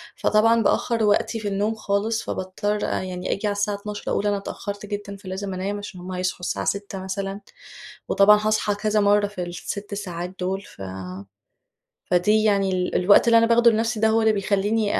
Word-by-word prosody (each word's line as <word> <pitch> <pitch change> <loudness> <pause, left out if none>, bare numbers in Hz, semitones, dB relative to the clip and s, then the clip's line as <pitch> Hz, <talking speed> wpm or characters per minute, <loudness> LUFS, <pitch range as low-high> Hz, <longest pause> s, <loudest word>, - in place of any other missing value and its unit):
فطبعًا 225 +1 +3
بأخّر 230 +2 +1
وقتي 210 +2 +2
في 210 - -4
النوم 205 +3 0
خالص، 215 +2 -1
فباضطّر 205 +3 -3
يعني 180 -1 -3
آجي 210 +2 -2
على - - +1
الساعة 205 0 -1
00:00 205 0 -6
أقول 205 - 0
أنا 205 -1 +1
اتأخّرت 200 +1 -6
جدًا 205 -1 -5
فلازم 190 0 -5
أنام، 195 +2 -3
علشان 205 -3 -8
هم 180 +1 -8
هيصحوا 185 0 -2
الساعة 180 - -3
06:00 200 -1 -3
مثلًا، 195 +1 -4 0.7
وطبعًا 210 +1 +6
هاصحى 215 -1 +1
كذا 210 +1 0
مرّه 205 0 +3
في 185 -3 -5
ال6 200 +4 -6
ساعات 180 -2 -5
دول 190 +2 -2
ف 100 - -15 1.3
فدي 210 +5 +3
يعني 200 -2 +2
ال 180 -1 -1
الوقت 200 +5 +5
اللي 230 0 +6
أنا 230 - +5
باخده 235 0 +5
لنفسي 225 0 0
ده 220 0 +3
هو 225 +1 +3
اللي 220 -1 +4
بيخلّيني 205 +2 0
205 Hz, 180 wpm, -23 LUFS, 190-215 Hz, 1.3 s, وطبعًا